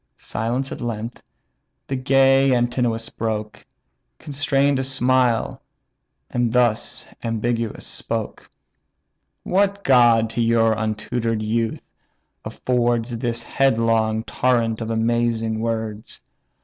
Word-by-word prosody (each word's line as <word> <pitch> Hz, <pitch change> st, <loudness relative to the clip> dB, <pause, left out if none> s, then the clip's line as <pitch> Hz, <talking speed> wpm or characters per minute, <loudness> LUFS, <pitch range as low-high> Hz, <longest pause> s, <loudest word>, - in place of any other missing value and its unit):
Silence 120 Hz, +5 st, -3 dB
at -, -, -6 dB
length 115 Hz, 0 st, -4 dB, 0.6 s
the 135 Hz, -, -3 dB
gay 135 Hz, 0 st, +4 dB
Antinous 120 Hz, -2 st, 0 dB
broke, 110 Hz, -1 st, -4 dB, 0.5 s
Constrain'd 140 Hz, -1 st, 0 dB
a -, -, 0 dB
smile, 130 Hz, -3 st, +1 dB, 0.7 s
and 120 Hz, -2 st, 0 dB
thus 120 Hz, -2 st, +1 dB, 0.2 s
ambiguous 115 Hz, 0 st, -2 dB
spoke: -, -, -5 dB, 0.9 s
"What 200 Hz, +1 st, +1 dB
god 120 Hz, -4 st, +5 dB
to 120 Hz, -, -1 dB
your 115 Hz, -1 st, +3 dB
untutor'd 110 Hz, +1 st, -2 dB
youth 115 Hz, +1 st, -1 dB, 0.6 s
affords 120 Hz, -1 st, -1 dB
This 115 Hz, 0 st, -3 dB
headlong 115 Hz, -4 st, +1 dB
torrent 115 Hz, -3 st, 0 dB
of 115 Hz, -, -4 dB
amazing 115 Hz, -1 st, 0 dB
words? 110 Hz, -2 st, -4 dB
115 Hz, 95 wpm, -22 LUFS, 115-125 Hz, 0.9 s, god